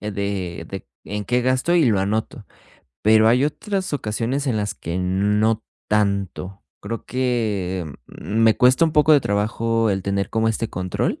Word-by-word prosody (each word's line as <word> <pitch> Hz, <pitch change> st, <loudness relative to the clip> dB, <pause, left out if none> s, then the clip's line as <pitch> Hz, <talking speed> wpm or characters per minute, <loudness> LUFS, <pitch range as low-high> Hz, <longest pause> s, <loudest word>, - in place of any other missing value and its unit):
eh, 105 Hz, -, -4 dB
de, 100 Hz, -3 st, -4 dB
de -, -, -7 dB, 0.2 s
en 105 Hz, 0 st, -4 dB
qué 125 Hz, 0 st, +1 dB
gasto 130 Hz, +7 st, +1 dB
y 165 Hz, -6 st, +4 dB
lo 105 Hz, -4 st, +2 dB
anoto. 105 Hz, +3 st, -2 dB, 0.6 s
Pero 110 Hz, +1 st, +5 dB
hay 125 Hz, +4 st, +4 dB
otras 190 Hz, +4 st, -3 dB
ocasiones, 130 Hz, +3 st, -2 dB
en 115 Hz, -, 0 dB
las 105 Hz, -1 st, -2 dB
que 85 Hz, +3 st, -4 dB
no 105 Hz, +4 st, +1 dB, 0.2 s
tanto. 100 Hz, -2 st, -1 dB, 0.2 s
Creo 115 Hz, +3 st, -5 dB
que, 110 Hz, -8 st, -1 dB, 0.2 s
mm, 110 Hz, -, -5 dB
me 110 Hz, -1 st, +5 dB
cuesta 130 Hz, +5 st, +5 dB
un 160 Hz, -, +1 dB
poco 155 Hz, 0 st, +5 dB
de 145 Hz, -, +6 dB
trabajo 115 Hz, +2 st, 0 dB
el 95 Hz, -1 st, -1 dB
tener 100 Hz, 0 st, -1 dB
como 110 Hz, 0 st, +1 dB
este 115 Hz, 0 st, -1 dB
control, 90 Hz, 0 st, -2 dB
110 Hz, 170 wpm, -22 LUFS, 100-125 Hz, 0.6 s, de